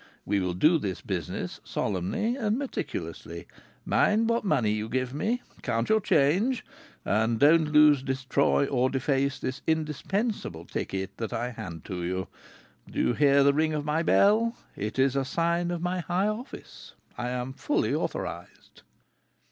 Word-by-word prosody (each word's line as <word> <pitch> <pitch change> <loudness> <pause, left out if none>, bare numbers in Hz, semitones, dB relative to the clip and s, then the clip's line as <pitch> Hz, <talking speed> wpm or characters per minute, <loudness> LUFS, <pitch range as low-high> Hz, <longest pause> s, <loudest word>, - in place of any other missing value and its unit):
We 100 0 +1
will 90 -2 -1
do 155 - +4
this 95 - -3
business - - -4
solemnly 100 - -1
and 220 -3 0
meticulously. 275 -1 -5 0.4
Mind 220 +2 +3
what 230 0 +1
money 135 - +2
you 110 +1 -2
give 130 +1 -1
me, 230 - -1 0.2
count 115 0 -1
your 220 0 +4
change, 195 - +2 0.4
and 110 +2 +1
don't 155 +1 +5
lose, 150 -2 +6
destroy, 135 +1 +1
or 130 -2 +1
deface 135 +1 0
this 130 +2 -4
indispensable 160 - -2
ticket 95 0 -4
that 115 +1 -4
I 120 +2 -2
hand 85 -8 -8
to 90 -2 -5
you. 95 +1 -2 0.6
Do - - -4
you - - +2
hear 140 +1 +4
the 140 0 +5
ting 155 +1 +1
of 145 -1 -3
my 155 +2 +1
bell? 220 +7 +3 0.2
It 105 +4 -4
is 135 0 +3
a 135 - +1
sign 170 +5 0
of 175 -1 -3
my 180 +1 -1
high 180 +3 0
office. 220 +5 -7 0.2
I 120 0 -3
am 125 +1 -3
fully 290 - 0
authorized." - - -5
140 Hz, 155 wpm, -27 LUFS, 120-175 Hz, 0.6 s, lose